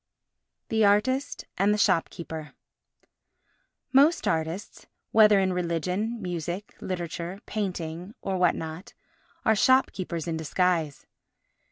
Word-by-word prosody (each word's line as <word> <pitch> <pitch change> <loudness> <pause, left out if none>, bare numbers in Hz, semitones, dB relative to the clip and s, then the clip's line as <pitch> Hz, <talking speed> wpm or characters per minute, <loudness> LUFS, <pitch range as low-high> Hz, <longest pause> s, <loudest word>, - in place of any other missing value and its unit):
The 220 -1 +2
Artist 225 +7 +2
and 200 +2 +4
the 210 - +2
Shopkeeper 165 -5 -1 1.4
Most 290 +5 +4
artists, 165 +4 -3 0.2
whether 210 -2 +6
in 190 -1 +1
religion, 180 +6 -2
music, 175 +1 -5
literature, 175 +1 -4
painting, 180 -2 -4
or 195 - -3
what 180 -2 +4
not, 160 +4 -7 0.5
are 220 - +4
shopkeepers 190 - +2
in 165 -1 -1
disguise. 160 -2 0
180 Hz, 100 wpm, -27 LUFS, 165-210 Hz, 1.4 s, whether